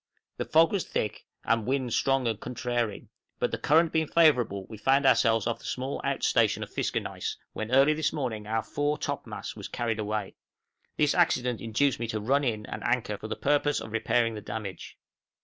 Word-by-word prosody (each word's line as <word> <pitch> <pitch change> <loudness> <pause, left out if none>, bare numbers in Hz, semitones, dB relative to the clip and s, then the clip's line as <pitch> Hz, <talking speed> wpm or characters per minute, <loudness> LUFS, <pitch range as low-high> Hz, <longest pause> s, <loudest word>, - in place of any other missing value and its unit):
The - - -2
fog 160 +1 +4
was 200 -3 0
thick, 105 - -3 0.2
and 115 -1 +1
wind 130 -3 0
strong 135 -2 +2
and 110 -3 -1
contrary, 120 -4 -3 0.3
but - - 0
the - - -3
current 160 +2 +3
being 160 -1 +1
favorable 125 - +3
we 110 +1 -10
found 135 +5 +3
ourselves 115 -4 +4
off 120 -1 -1
the - - -17
small 130 +2 -3
out - - -1
station - - +2
of - - -9
Fiskernaes, - - -2 0.2
when 110 0 -4
early 135 +4 +5
this 155 0 0
morning 115 -8 -3
our 110 0 0
fore 145 +1 -1
topmast - - -5
was - - -7
carried 115 -2 -2
away; 105 -1 -2 0.6
this 150 -1 +3
accident 125 -9 +2
induced 115 +4 +1
me 115 - -2
to 110 -1 -2
run 135 +7 +1
in 110 -5 -1
and - - -6
anchor 120 -3 0
for 110 - -6
the 110 - -3
purpose 145 0 +1
of 110 -1 -8
repairing 115 +1 +1
the 105 - -6
damage. 105 -2 -7
120 Hz, 195 wpm, -28 LUFS, 110-140 Hz, 0.6 s, early